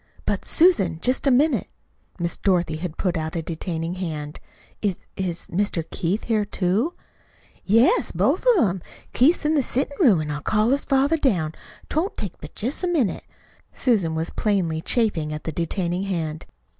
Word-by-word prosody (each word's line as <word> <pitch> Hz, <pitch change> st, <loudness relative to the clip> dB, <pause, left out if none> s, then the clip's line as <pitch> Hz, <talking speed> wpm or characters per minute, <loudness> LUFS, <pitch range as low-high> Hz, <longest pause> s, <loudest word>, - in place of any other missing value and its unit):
"But, -, -, -1 dB
Susan, 195 Hz, -, +3 dB
just 255 Hz, -, 0 dB
a -, -, +6 dB
minute!" 285 Hz, +5 st, +3 dB, 0.5 s
Miss 170 Hz, -1 st, -2 dB
Dorothy 175 Hz, -5 st, +1 dB
had 165 Hz, -1 st, -5 dB
put 180 Hz, -2 st, 0 dB
out 160 Hz, +1 st, -3 dB
a 165 Hz, -, -2 dB
detaining 165 Hz, 0 st, -3 dB
hand. 155 Hz, -5 st, -5 dB, 0.4 s
"Is 200 Hz, -4 st, 0 dB, 0.2 s
is 180 Hz, -3 st, -2 dB
Mr. 180 Hz, -3 st, -1 dB
Keith 185 Hz, +6 st, -1 dB
here, 220 Hz, -2 st, +1 dB
too?" 205 Hz, -, 0 dB, 0.7 s
"Yes, 230 Hz, -, +4 dB
both -, -, +1 dB
of -, -, +5 dB
'em. 185 Hz, 0 st, -3 dB, 0.3 s
Keith 295 Hz, +8 st, +5 dB
is -, -, -11 dB
in 305 Hz, -, +3 dB
the 295 Hz, -, +3 dB
settin' 270 Hz, +3 st, -1 dB
room 230 Hz, -, +5 dB
an' 150 Hz, -1 st, -3 dB
I'll 150 Hz, 0 st, -4 dB
call 215 Hz, -, +2 dB
his 280 Hz, -, +2 dB
father 275 Hz, +4 st, +3 dB
down. 180 Hz, -, +1 dB, 0.4 s
'T -, -, -7 dB
won't 360 Hz, +6 st, 0 dB
take 200 Hz, -5 st, -4 dB
but 150 Hz, -, -10 dB
jest 255 Hz, -, -3 dB
a -, -, +2 dB
minute." 295 Hz, -, 0 dB, 0.5 s
Susan 195 Hz, -11 st, +1 dB
was 160 Hz, +1 st, -2 dB
plainly 180 Hz, -7 st, 0 dB
chafing 180 Hz, -9 st, +1 dB
at 150 Hz, -, -7 dB
the 160 Hz, -, -3 dB
detaining 175 Hz, +3 st, -2 dB
hand. 160 Hz, -5 st, -3 dB
190 Hz, 180 wpm, -23 LUFS, 165-250 Hz, 0.7 s, a